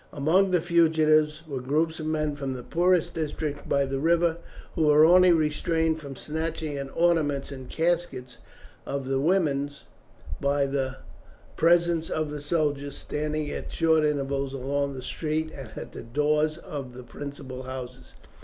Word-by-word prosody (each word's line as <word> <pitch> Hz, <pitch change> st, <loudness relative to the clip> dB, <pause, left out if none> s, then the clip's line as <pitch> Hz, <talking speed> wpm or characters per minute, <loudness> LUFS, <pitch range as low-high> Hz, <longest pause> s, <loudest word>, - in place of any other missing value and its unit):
Among 170 Hz, +7 st, +3 dB
the 180 Hz, -2 st, +2 dB
fugitives 155 Hz, -2 st, +3 dB
were 135 Hz, -4 st, -4 dB
groups 160 Hz, +5 st, 0 dB
of 155 Hz, -, -4 dB
men 155 Hz, -2 st, -1 dB
from 135 Hz, -2 st, -4 dB
the 125 Hz, -, -7 dB
poorest 175 Hz, +2 st, +2 dB
districts 150 Hz, -2 st, -3 dB
by 140 Hz, 0 st, +2 dB
the 135 Hz, 0 st, -3 dB
river, 170 Hz, +2 st, +2 dB, 0.4 s
who 160 Hz, -, +1 dB
were 150 Hz, +1 st, +7 dB
only 180 Hz, +2 st, +7 dB
restrained 160 Hz, 0 st, +1 dB
from 140 Hz, -3 st, -8 dB
snatching 160 Hz, +1 st, -3 dB
at 140 Hz, -1 st, -4 dB
the -, -, -15 dB
ornaments 155 Hz, -5 st, +1 dB
and 130 Hz, -2 st, -8 dB
caskets 160 Hz, -8 st, -1 dB, 0.5 s
of 140 Hz, -2 st, -4 dB
the 135 Hz, 0 st, 0 dB
women 145 Hz, -3 st, +1 dB, 0.7 s
by 140 Hz, 0 st, +1 dB
the 135 Hz, -1 st, -2 dB, 0.6 s
presence 170 Hz, -1 st, +3 dB
of 155 Hz, -1 st, -2 dB
the 150 Hz, -1 st, -5 dB
soldiers, 145 Hz, -2 st, -1 dB
standing 150 Hz, 0 st, -3 dB
at -, -, -6 dB
short 160 Hz, -1 st, +3 dB
intervals 140 Hz, -2 st, -1 dB
along 140 Hz, +1 st, -2 dB
the 130 Hz, -, -7 dB
street 155 Hz, +3 st, -2 dB
and 135 Hz, -5 st, -8 dB
at -, -, -7 dB
the -, -, -8 dB
doors 150 Hz, +5 st, +1 dB
of 135 Hz, -6 st, -7 dB
the 125 Hz, -, -9 dB
principal 135 Hz, -1 st, -8 dB
houses. 130 Hz, -1 st, -8 dB
150 Hz, 160 wpm, -26 LUFS, 140-160 Hz, 0.7 s, were